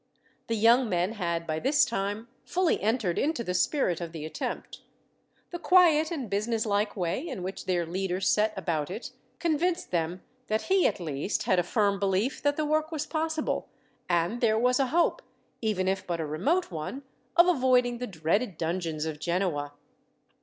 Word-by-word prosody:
The 230 - 0
young 230 +3 +4
men 180 +1 +1
had, 170 -6 -2
by 155 -1 -2
this 290 - +4
time, 205 0 -3 0.2
fully 365 -1 +1
entered 215 -5 0
into 300 -4 0
the 180 - -2
spirit 180 - +1
of 170 -1 -5
the 155 -2 -6
attempt. 155 - -5 0.7
The 345 - -5
quiet 335 -4 +5
and 290 -9 -4
businesslike 210 0 0
way, 180 - -2
in 255 - -5
which 190 +1 -5
their 175 -2 +1
leader 185 +2 -2
set 210 +2 +2
about 160 -4 -1
it, 225 +8 -6 0.3
convinced 340 +3 0
them 170 +1 -1 0.2
that 215 +1 0
he 380 -1 +3
at - - -2
least 155 +2 -2
had 185 - +2
a - - +2
firm 200 +1 +1
belief 200 +7 0
that 290 0 +1
the 310 - 0
work 310 +1 0
was 310 -2 -2
possible; 315 0 -2 0.4
and 175 +7 +1
there 220 -2 +3
was 250 +3 +3
a 270 - +2
hope, 345 - +2 0.4
even 210 -5 0
if 195 +1 -1
but 170 -2 -2
a 160 - -1
remote 260 - 0
one, 170 - -5 0.3
of 345 +1 +7
avoiding 250 -6 +3
the 250 - -3
dreaded 180 +3 -1
dungeons 165 -2 -2
of 155 -2 -4
Genoa. 170 -4 -1
210 Hz, 175 wpm, -28 LUFS, 175-275 Hz, 0.7 s, of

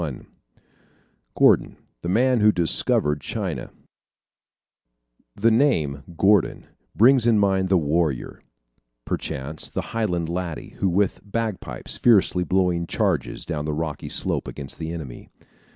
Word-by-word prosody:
Died. 75 -7 -5 1.1
GORDON - - +3 0.2
THE 85 - -4
MAN 125 +5 +3
WHO 105 0 +5
"DISCOVERED" 75 -3 +1
CHINA - - -4 1.7
The 115 +3 +3
name, 80 - +2 0.2
Gordon, 100 0 +2 0.3
brings 125 +1 +5
to 120 - +4
mind 95 -3 +2
the 95 - +4
warrior 75 -3 -1 0.6
perchance 70 +4 -4
the - - -5
Highland 90 -7 -1
laddie 85 -2 -5
who 95 - +1
with 95 +2 +1
bagpipes 110 -1 -4
fiercely 100 -6 +4
blowing 90 -2 0
charges - - -1
down 75 -3 -3
the 75 - -2
rocky 75 -1 -4
slope - - -1
against 70 -1 -8
the 80 0 -4
enemy. 75 -8 -8
90 Hz, 120 wpm, -23 LUFS, 80-105 Hz, 1.7 s, WHO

